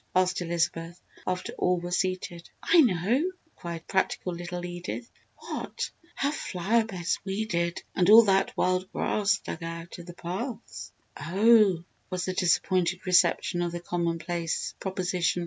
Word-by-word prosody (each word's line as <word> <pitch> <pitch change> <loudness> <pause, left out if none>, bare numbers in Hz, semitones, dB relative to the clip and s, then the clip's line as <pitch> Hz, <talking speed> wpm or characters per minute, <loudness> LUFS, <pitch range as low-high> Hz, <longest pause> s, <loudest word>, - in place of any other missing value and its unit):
asked 185 0 +2
Elizabeth 170 0 -1 0.3
after 185 0 -2
all 180 -1 +2
were 175 +1 -6
seated. 180 -2 -2
"I 335 0 +6
know!" 240 - +2 0.2
cried 170 -1 -7
practical 190 -1 0
little 175 +1 -5
Edith. 175 +7 -6 0.3
"What?" - - -5 0.2
"Her 280 +1 0
flower 220 - 0
beds 185 -6 -2
weeded 190 -4 -2
and 180 0 +2
all 225 +2 +10
that 195 -2 +2
wild 185 +1 +1
grass 200 -1 +1
dug - - -7
out 165 +1 -6
of 170 - -10
the 175 - -9
paths." 215 +8 -6 0.3
"Oh!" 200 -1 +4 0.3
was 185 -1 -2
the 185 - -2
disappointed 180 0 +1
reception 180 -1 +3
of 175 -1 -1
the 175 - -3
commonplace 170 -1 -2
proposition. 180 -2 -1
180 Hz, 140 wpm, -28 LUFS, 170-195 Hz, 0.3 s, all